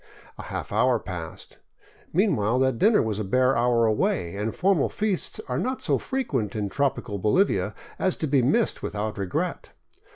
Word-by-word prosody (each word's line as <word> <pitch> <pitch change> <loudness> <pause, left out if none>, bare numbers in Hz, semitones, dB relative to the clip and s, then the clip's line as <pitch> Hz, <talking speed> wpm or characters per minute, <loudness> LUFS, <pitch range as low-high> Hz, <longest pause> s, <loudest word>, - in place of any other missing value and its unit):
A - - -4
half - - -6
hour 125 -1 +3
passed. 90 -6 -8 0.5
Meanwhile 125 - +2
that 130 -3 +1
dinner 220 +1 +4
was 110 -2 -2
a - - -1
bare 130 +6 +2
hour 120 -1 +3
away, 100 -5 0
and 105 +2 -3
formal 185 -4 +2
feasts 210 -4 -1
are 125 0 -1
not 260 +1 -2
so - - +1
frequent 140 - -2
in 105 -2 -2
tropical 125 -5 -1
Bolivia 145 - +1 0.2
as 185 - +1
to - - -3
be 135 -2 +3
missed 180 - +1
without 105 0 -4
regret. 95 -2 -3
125 Hz, 165 wpm, -25 LUFS, 105-170 Hz, 0.5 s, dinner